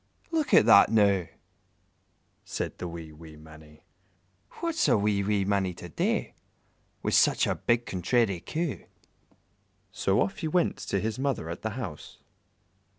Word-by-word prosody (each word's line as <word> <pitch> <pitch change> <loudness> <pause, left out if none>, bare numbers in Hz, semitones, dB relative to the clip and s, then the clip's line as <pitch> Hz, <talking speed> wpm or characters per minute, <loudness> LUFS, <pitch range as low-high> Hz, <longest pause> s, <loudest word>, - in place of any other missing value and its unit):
"Look 320 -3 -1
at - - +6
that, 100 -3 +7
now!" 100 -5 +3 1.2
said - - -5
the 90 - -4
wee, 85 -2 -8
wee 80 0 -13
Mannie 75 0 -16 0.7
"What's 335 -1 -1
a - - +4
wee, 100 0 +1
wee 100 -1 0
mannie 95 -3 0
to 90 - -10
do, - - 0 0.8
Wi' - - -1
such - - +4
a - - 0
big 120 0 0
contrairy 95 +1 0
Coo?" 160 - -4 1.1
So 95 +1 0
off 195 - -1
he 165 - -2
went 175 +2 +1
to 100 - -2
his 110 +4 -3
mother 135 - -2
at 85 - -7
the 110 +2 -4
house. 95 - -7
100 Hz, 150 wpm, -27 LUFS, 85-120 Hz, 1.2 s, that